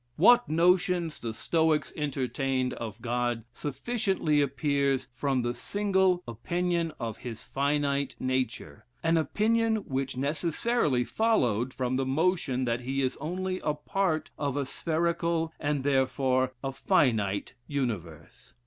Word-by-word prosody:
What 240 +8 +6
notions 175 0 +2
the 115 - -4
Stoics 155 +7 +1
entertained 135 -2 -1
of 110 -1 -7
God 120 -1 -1
sufficiently 155 - 0
appears 140 -1 +1
from 130 0 0
the 120 0 -1
single 190 +5 +1
opinion 170 +8 -1
of 115 -2 -4
his 120 -3 -7
finite 140 -1 0
nature; 130 -1 -2 0.2
an 165 0 +3
opinion 220 +8 +2
which 135 -1 -2
necessarily 150 - +1
followed 125 - +1
from 130 0 -1
the 135 - 0
notion 135 -3 +1
that 120 0 -1
he 135 +2 -1
is 130 - 0
only 185 +4 -3
a 150 - -1
part 160 +1 -1
of 140 -2 -1
a 140 - 0
spherical, 165 +2 0
and 145 -2 -1
therefore 130 -1 +2
a 135 - -1
finite 115 - +1
universe. 105 - -5
140 Hz, 125 wpm, -28 LUFS, 130-170 Hz, 0.2 s, What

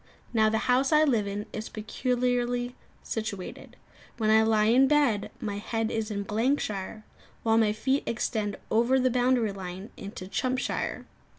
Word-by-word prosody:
Now 220 -2 +4
the 220 - +1
house 260 +3 +3
I 305 0 +6
live 235 -9 +2
in 205 +1 -4
is 215 - -5
peculiarly 245 +2 -1 0.3
situated. 215 -4 -5 0.4
When 215 -1 +2
I 220 0 +6
lie 220 -1 +3
in 250 +5 +5
bed, 265 -8 +2
my 205 -2 -3
head 225 +1 -2
is 220 -1 -2
in 200 -1 -2
Blankshire, 215 -2 -1 0.4
while 225 0 +4
my 215 -2 +3
feet 265 +6 0
extend 215 -3 -1 0.2
over 240 +4 +3
the 255 0 +2
boundary 245 -3 +2
line 190 +1 -7
into 200 -2 -7
Chumpshire. 255 +5 -2
225 Hz, 155 wpm, -28 LUFS, 210-250 Hz, 0.4 s, I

